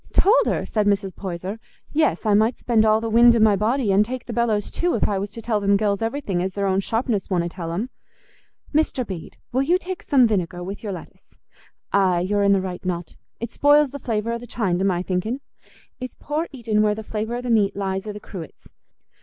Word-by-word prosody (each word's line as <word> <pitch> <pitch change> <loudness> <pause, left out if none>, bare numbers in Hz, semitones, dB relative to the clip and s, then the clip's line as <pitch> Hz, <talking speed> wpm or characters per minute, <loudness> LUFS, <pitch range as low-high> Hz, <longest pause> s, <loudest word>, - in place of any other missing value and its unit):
"Told 425 +6 +4
her?" - - 0
said 210 -2 0
Mrs. 195 -2 0
Poyser. 190 +3 -5 0.3
"Yes, 310 -5 +1
I 210 - +3
might 220 +4 +3
spend 225 -3 +2
all 215 0 +4
the 230 - -2
wind 235 +1 +7
i' - - +3
my 215 -2 +5
body, 220 +2 +1
an' 195 +1 +5
take 250 +3 -3
the 235 - -6
bellows 225 -3 0
too, 350 0 0
if 225 - +2
I 200 -2 0
was 200 +1 -3
to 225 +2 -9
tell 215 -2 +1
them 200 0 +3
gells 200 -1 0
everything 225 -6 -1
as 190 +1 -2
their 200 0 -1
own 190 0 +2
sharpness 225 0 -1
wonna 175 -3 +1
tell 170 -1 -6
'em. 215 +9 -3 0.8
Mr. 295 -4 +1
Bede, 185 -6 -8
will 260 - +1
you 335 +7 +3
take 370 0 -6
some 265 -4 +4
vinegar 180 -5 -1
with 195 +3 -6
your 210 - -4
lettuce? 180 -3 -10 0.6
Aye 185 -3 +3
you're 205 +3 +1
i' - - +3
the 195 -1 +4
right 185 -1 -5
not. 175 -2 -4 0.2
It 235 0 -5
spoils 290 -1 +4
the 285 - -6
flavour 230 -2 -2
o' 235 - -2
the 245 - -10
chine, 195 -6 -1
to - - 0
my 180 -2 +1
thinking. 195 +8 -2 0.6
It's 255 0 -6
poor 305 +3 -2
eating 225 -6 0
where 210 -1 +2
the 220 - -6
flavour 220 +2 -3
o' 245 - -3
the 250 -1 -2
meat 205 -3 +3
lies 195 0 -2
i' - - -2
the 210 - -8
cruets. 180 -6 -10
210 Hz, 230 wpm, -23 LUFS, 195-240 Hz, 0.8 s, wind